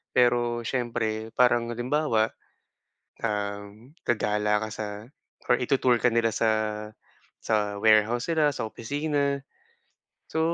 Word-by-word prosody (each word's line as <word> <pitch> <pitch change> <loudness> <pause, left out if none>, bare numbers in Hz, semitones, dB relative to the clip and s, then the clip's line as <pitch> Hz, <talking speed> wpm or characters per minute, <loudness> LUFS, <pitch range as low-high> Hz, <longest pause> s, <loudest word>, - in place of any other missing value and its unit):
Pero 120 -1 +2
siyempre, 115 -3 -2
parang 120 -1 +3
halimbawa, 120 -2 +1 0.9
um, 105 +3 -4
gagala 105 -2 +1
ka 110 - -3
sa 110 - -4 0.6
or 125 - +5
itu-tour 125 -1 +2
ka 120 0 +2
nila 115 0 +2
sa 110 +1 +2 0.9
sa 105 -2 -1
warehouse 110 +4 +3
nila, 155 -3 +3
sa 110 - -4
opisina. 140 +4 -1 0.9
So 160 - -3
115 Hz, 110 wpm, -26 LUFS, 110-125 Hz, 0.9 s, or